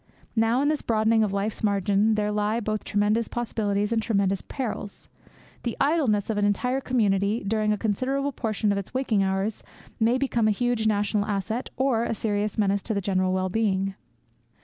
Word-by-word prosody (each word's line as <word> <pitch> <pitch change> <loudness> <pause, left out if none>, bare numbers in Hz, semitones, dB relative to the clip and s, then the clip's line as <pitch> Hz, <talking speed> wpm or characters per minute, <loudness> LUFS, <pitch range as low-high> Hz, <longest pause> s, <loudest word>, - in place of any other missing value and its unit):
Now 225 +4 +2
in 290 - +2
this 305 -1 0
broadening 220 0 +2
of 210 - 0
life's 200 +2 -2
margin 205 +1 +2
there 210 0 0
lie 210 +2 0
both 215 -1 -2
tremendous 210 +2 +1
possibilities 210 -3 -1
and 230 -1 +2
tremendous 195 -4 +1
perils. 220 -6 -5 0.5
The 235 - -3
idleness 265 -10 +2
of 210 - -1
an - - +1
entire 250 +6 0
community 210 -3 +1
during 215 0 +1
a 210 - +1
considerable 260 +7 -1
proportion 215 -4 -1
of 200 - 0
its 200 +5 -9
waking 245 -6 +1
hours 195 +2 -1 0.4
may 235 +3 +3
become 245 -4 +1
a 210 -2 +1
huge 245 -3 +1
national 205 0 +1
asset 215 +4 -2
or 255 -4 +2
a 230 - -1
serious 210 -1 -1
menace 200 -1 +2
to 220 - -3
the - - +1
general 185 -1 0
wellbeing. 190 +1 0
215 Hz, 175 wpm, -25 LUFS, 200-230 Hz, 0.5 s, may